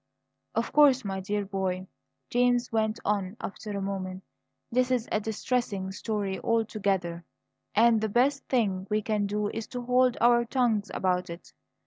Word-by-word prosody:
"Of - - -1
course, 275 -5 +5
my 195 -1 -2
dear 205 +2 -2
boy," 190 -1 -2 0.5
James 245 0 +2
went 220 0 0
on 200 0 -1
after 210 +2 -7
a 200 -1 -3
moment, 190 -1 -4 0.5
"this 250 +1 +2
is 245 -2 0
a 215 - +2
distressing 215 -2 -2
story 200 -1 -3
altogether, 200 -7 0 0.5
and 225 0 +5
the 220 - 0
best 270 +6 +2
thing 200 -7 0
we 210 0 +1
can 210 -2 0
do 205 0 -1
is 220 0 -5
to 245 -1 -5
hold 250 0 +3
our 240 0 +5
tongues 235 -4 +1
about 180 -1 0
it. 170 +1 -10
215 Hz, 155 wpm, -28 LUFS, 195-240 Hz, 0.5 s, course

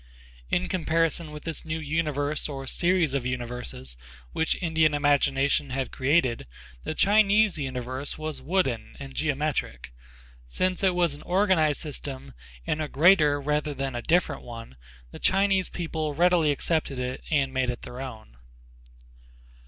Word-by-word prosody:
In 180 +1 +1
comparison 165 -2 0
with 150 0 -9
this 165 -1 -4
new 160 0 -3
universe 150 -1 -1
or 135 -2 -6
series 170 +1 +2
of 140 -3 0
universes 120 - -4 0.4
which 160 - +1
Indian 160 -3 +2
imagination 140 -1 +2
had 130 0 -3
created, 130 - +1 0.4
the 155 - -4
Chinese 210 -2 +4
universe 130 0 -4
was 155 -1 -4
wooden 140 -9 -1
and 135 -1 -8
geometric. 145 - -2 0.5
Since 185 - 0
it 185 -2 +3
was 175 -4 +2
an 145 - -10
organized 180 -6 +2
system 135 - -5 0.3
and 155 - -1
a 155 - -2
greater 150 -1 +4
rather 150 +1 -1
than 135 -1 -3
a 120 - -3
different 175 +7 +1
one, 115 - -9 0.4
the - - -10
Chinese 195 -1 +2
people 160 -3 -3
readily 175 -1 +4
accepted 145 -1 0
it 125 +1 -3
and 140 -4 +1
made 130 -1 0
it 120 - -4
their 125 +2 -7
own. 110 - -9
150 Hz, 145 wpm, -26 LUFS, 130-165 Hz, 0.5 s, Chinese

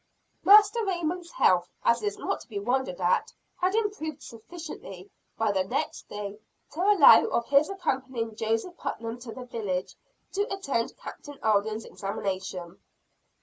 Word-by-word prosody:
Master 420 +3 +7
Raymond's 350 -2 -2
health, 180 - +3
as 235 0 +3
is 205 -1 -2
not - - -2
to - - -14
be 215 - -6
wondered 240 -2 -1
at, 180 - +1 0.3
had 370 +2 +1
improved 405 -9 -2
sufficiently 230 - -9 0.3
by 220 -2 +2
the 190 -2 +1
next 190 - -3
day, 205 0 -6 0.3
to 325 - -4
allow 395 -5 +8
of 235 - 0
his 285 +2 +5
accompanying 260 - -2
Joseph 225 +11 -2
Putnam 230 +1 -4
to 240 -1 -8
the 250 +2 -8
village, 200 -7 -3 0.4
to 405 +1 -1
attend 280 -12 -2
Captain 290 -1 -10
Alden's 215 +1 +1
examination. 190 -3 -4
235 Hz, 145 wpm, -27 LUFS, -, 0.4 s, allow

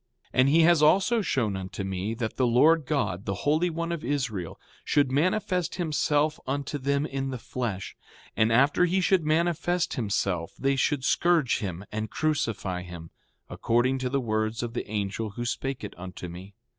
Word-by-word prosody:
And 130 +1 +4
he 160 +2 +5
also 175 +7 +4
has 205 -6 -1
shown 115 -8 0
unto 95 +1 -5
me 95 +3 -3
that 110 -1 -3
the 130 - +2
Lord 150 +5 +4
God, 115 - -1
the 100 -1 -4
Holy 155 +5 +3
One 170 +1 -3
of 170 -2 -4
Israel, 120 - -3 0.2
should 140 -3 +2
manifest 180 +4 0
himself 155 -3 +1
unto 140 +2 -2
them 140 +2 0
in 135 -2 -3
the 130 - -4
flesh; 115 -5 -4 0.4
and 110 +1 +3
after 140 +9 +4
he 180 +2 +1
should 185 -2 +3
manifest 170 +3 +1
himself 100 -6 -1
they 135 0 +1
should 135 0 0
scourge 170 -7 +2
him 95 -1 -5
and 110 0 -3
crucify 115 - -1
him, 85 -2 -9 0.4
according 125 +3 +1
to 130 -1 -2
the 140 +2 0
words 110 -1 -1
of 115 -1 -4
the 120 - -4
angel 105 +1 -2
who 120 - -3
spake 135 +1 -3
it 105 - -6
unto 90 0 -7
me. 90 +3 -10
130 Hz, 175 wpm, -27 LUFS, 105-155 Hz, 0.4 s, he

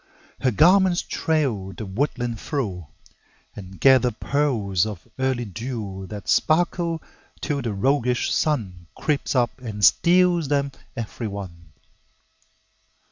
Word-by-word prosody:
Her 130 - +2
garments 180 - +4
trail 125 -12 -1
the 110 - -7
woodland 120 +2 -2
through, 100 - -3 0.7
And 95 -1 -10
gather 130 -2 +5
pearls 115 -7 0
of 100 -6 -8
early 130 -2 0
dew 105 -3 -6
That 105 -1 -8
sparkle 165 0 +1 0.4
till 145 -2 -2
the 115 - -2
roguish 125 +3 +1
Sun 95 - -1
Creeps 145 -2 -1
up 120 0 +1
and 105 -4 0
steals 175 -2 +4
them 140 0 0 0.3
every 115 0 -4
one. 90 -5 -8
120 Hz, 115 wpm, -23 LUFS, 100-145 Hz, 0.7 s, gather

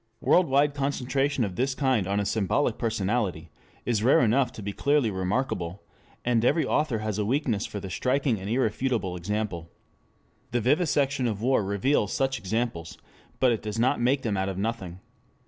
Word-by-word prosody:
3 - - -4
Worldwide 145 -4 +4
concentration 140 -1 0
of 95 -4 -3
this 130 +4 0
kind 130 -9 +1
on 100 +1 0
a 100 - -1
symbolic 110 +5 0
personality 100 -7 -1 0.3
is 115 -4 0
rare 125 +4 +5
enough 120 +2 +2
to 110 - -8
be 100 0 -4
clearly 140 -1 +2
remarkable, 95 -1 -2 0.4
and 120 -2 +2
every 155 +6 +3
author 150 -6 +1
has 110 -1 -2
a - - +1
weakness 115 -2 0
for 105 - -6
the 95 - -7
striking 125 +4 0
and 95 +2 -6
irrefutable 115 -4 0
example. 90 -2 -3 0.8
The 120 - 0
vivisection 140 -1 +1
of 110 -1 -3
war 130 -3 +3
reveals 100 +3 +1
such 135 0 0
examples, 95 -4 -3 0.4
but 130 - +4
it 115 - -1
does 105 0 -5
not 125 +2 +2
make 130 +3 +2
them 105 -4 -1
out 95 +1 0
of 95 - -5
nothing. 95 -4 -4
115 Hz, 175 wpm, -26 LUFS, 100-135 Hz, 0.8 s, rare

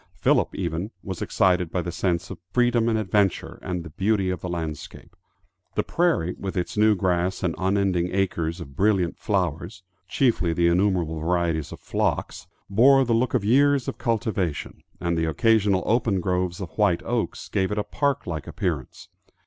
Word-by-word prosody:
Philip - - +2
even 85 +1 -3
was 95 -3 -6
excited 90 -3 +2
by 90 +1 -2
the 85 - -4
sense 85 0 -1
of 95 - -8
freedom 120 -2 +2
and 110 - +1
adventure, 100 -2 0
and 90 -2 -4
the 85 - -10
beauty 95 +2 +1
of 90 - -4
the 90 - -4
landscape. 80 -3 -6 0.6
The - - +1
prairie, 165 - +1
with 95 -1 -4
its 90 - -2
new 105 0 +4
grass 90 0 0
and 85 -3 +1
unending 95 -2 +1
acres 90 -3 -1
of 70 -5 -9
brilliant 95 -2 +1
flowers 90 -1 -2 0.2
chiefly 110 -9 +1
the 85 +1 +3
innumerable 85 -3 +1
varieties 85 -2 0
of - - -9
phlox - - -2 0.2
bore 130 +7 +5
the 115 - +1
look 120 +2 +1
of 110 -5 0
years 140 +3 +3
of - - -4
cultivation, 105 - -2 0.2
and 85 0 -1
the 80 0 0
occasional 100 +2 +2
open 110 -4 +1
groves 90 -1 -1
of 90 -5 -7
white 100 -5 +3
oaks 120 -1 -2
gave 95 -1 0
it 105 - -2
a 105 - +1
park 140 +3 -1
like 80 -4 -5
appearance. - - -4
95 Hz, 175 wpm, -24 LUFS, 85-110 Hz, 0.6 s, bore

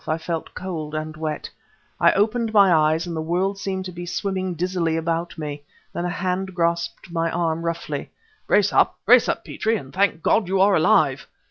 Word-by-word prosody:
I 155 - 0
felt 165 0 -5
cold 160 -5 -5
and 155 0 -4
wet. 155 -1 -4 0.5
I - - +6
opened 220 +3 +1
my 200 -4 +6
eyes 155 +1 +2
and 170 -1 -5
the 160 - -2
world 185 +5 -1
seemed 190 -1 -3
to 185 - -5
be 175 0 -7
swimming 185 -1 -2
dizzily 170 -1 -1
about 165 +1 -2
me. 150 -2 -5 0.3
Then 175 - -3
a - - -1
hand 185 +1 -2
grasped 170 +1 -1
my 165 -1 0
arm, 165 -1 -1
roughly. 170 0 -4 0.4
"Brace 205 -1 +3
up! - - +3
Brace 245 +2 +6
up, - - -2
Petrie 225 +1 -1
and 135 -8 -10
thank 185 -4 +1
God 210 -4 +2
you 190 +1 0
are 195 +1 +5
alive! 150 -3 +3
175 Hz, 195 wpm, -23 LUFS, 160-190 Hz, 0.5 s, I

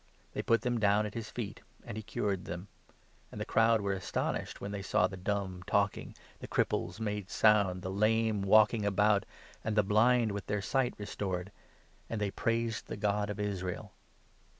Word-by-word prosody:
They - - -2
put 115 - +2
them 120 -1 0
down 105 0 +3
at 105 - -5
his 115 -2 -5
feet, 115 -5 -5 0.2
and - - -6
he 110 - -4
cured 100 -2 -2
them; 90 +4 -6 0.6
and - - -8
the - - -2
crowd 115 -1 +3
were 100 -1 0
astonished, 95 -1 -2
31 - - -15
when 100 - -4
they 100 -1 -4
saw 90 -1 +2
the 95 - -3
dumb 95 -1 -2
talking, 100 -1 0 0.2
the - - -7
cripples - - 0
made 105 -3 -3
sound, 100 -4 +3
the 95 - -3
lame 110 +1 +2
walking 105 +2 +5
about, 100 0 +3 0.4
and 110 -1 -1
the 105 - +4
blind 115 +3 +4
with 100 0 -5
their 105 - 0
sight 130 +5 0
restored; 95 -2 -4 0.6
and 115 - -2
they 105 -2 -1
praised 115 +1 -1
the - - -5
God 105 0 0
of 105 0 -4
Israel. 95 -3 -3
105 Hz, 185 wpm, -32 LUFS, 100-110 Hz, 0.6 s, walking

